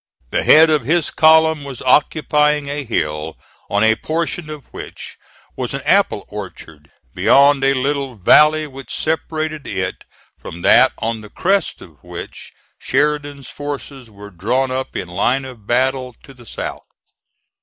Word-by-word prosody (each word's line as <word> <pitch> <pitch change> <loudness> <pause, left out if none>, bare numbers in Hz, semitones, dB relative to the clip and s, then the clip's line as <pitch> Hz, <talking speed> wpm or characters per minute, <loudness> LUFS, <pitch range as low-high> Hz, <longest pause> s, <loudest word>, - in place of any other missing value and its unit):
The - - +1
head 160 +1 +6
of 150 -5 +2
his 160 +5 0
column 160 -1 +4
was 135 -3 -8
occupying 150 +1 +2
a 145 +1 -3
hill, 80 - -3 0.3
on 100 +1 +1
a 110 0 +5
portion 160 +4 -3
of 150 -2 -9
which - - -9 0.4
was - - -4
an - - -4
apple - - +2
orchard, 75 -2 -10 0.2
beyond 140 0 +4
a 135 0 +3
little 135 -1 -2
valley 150 - +5
which 135 -4 -11
separated 155 -1 -3
it 95 -1 -4 0.4
from 85 +1 -10
that - - +6
on 115 -1 -3
the 105 - -12
crest 195 - -1
of 75 -6 -18
which - - -9 0.3
Sheridan's 145 0 -1
forces 140 -3 -7
were 100 -1 -12
drawn 125 +9 -1
up 130 +1 -4
in - - -4
line 120 +10 0
of 120 -6 -12
battle 130 0 0
to 135 - -14
the 120 -3 -17
south. - - -6
135 Hz, 150 wpm, -18 LUFS, 115-150 Hz, 0.4 s, head